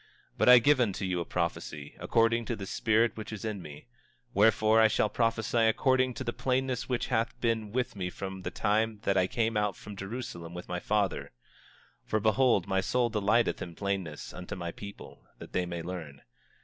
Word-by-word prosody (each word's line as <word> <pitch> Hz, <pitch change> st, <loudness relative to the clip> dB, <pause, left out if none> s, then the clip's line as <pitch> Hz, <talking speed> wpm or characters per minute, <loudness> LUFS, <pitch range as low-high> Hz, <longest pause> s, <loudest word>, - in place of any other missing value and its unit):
But -, -, +3 dB
I 125 Hz, -, +11 dB
give 140 Hz, +4 st, +4 dB
unto 100 Hz, -5 st, 0 dB
you 90 Hz, -1 st, -1 dB
a 85 Hz, -, -3 dB
prophecy, 75 Hz, -4 st, -3 dB
according 115 Hz, 0 st, +2 dB
to 120 Hz, -, -2 dB
the 100 Hz, -2 st, -6 dB
spirit 110 Hz, +2 st, +2 dB
which 110 Hz, 0 st, -7 dB
is 110 Hz, +1 st, -6 dB
in 105 Hz, -3 st, -3 dB
me; 75 Hz, -3 st, -10 dB, 0.5 s
wherefore 110 Hz, 0 st, +5 dB
I 110 Hz, -, +7 dB
shall 105 Hz, 0 st, +1 dB
prophesy 115 Hz, 0 st, +1 dB
according 130 Hz, +2 st, +2 dB
to -, -, -4 dB
the 120 Hz, -, -3 dB
plainness 130 Hz, -1 st, -1 dB
which 125 Hz, -2 st, 0 dB
hath 115 Hz, +1 st, 0 dB
been 115 Hz, -3 st, 0 dB
with 125 Hz, 0 st, -1 dB
me 90 Hz, -2 st, -3 dB
from 95 Hz, +1 st, -6 dB
the -, -, -3 dB
time 110 Hz, +1 st, 0 dB
that 100 Hz, -, +1 dB
I 95 Hz, -1 st, +3 dB
came 115 Hz, +2 st, 0 dB
out 105 Hz, -2 st, +1 dB
from 105 Hz, -1 st, -10 dB
Jerusalem 95 Hz, -5 st, -6 dB
with 90 Hz, -, -7 dB
my 90 Hz, 0 st, -3 dB
father; 100 Hz, 0 st, -1 dB, 0.7 s
for 110 Hz, -, 0 dB
behold, 110 Hz, -2 st, +3 dB
my 95 Hz, -1 st, +1 dB
soul 120 Hz, +3 st, +1 dB
delighteth 110 Hz, +2 st, +2 dB
in 85 Hz, -1 st, -6 dB
plainness 95 Hz, -6 st, -3 dB
unto 90 Hz, -, -6 dB
my 85 Hz, -2 st, -4 dB
people, 100 Hz, -10 st, -10 dB, 0.2 s
that -, -, -11 dB
they 90 Hz, -1 st, 0 dB
may 85 Hz, -1 st, -4 dB
learn. 80 Hz, -6 st, -7 dB
105 Hz, 195 wpm, -30 LUFS, 95-115 Hz, 0.7 s, I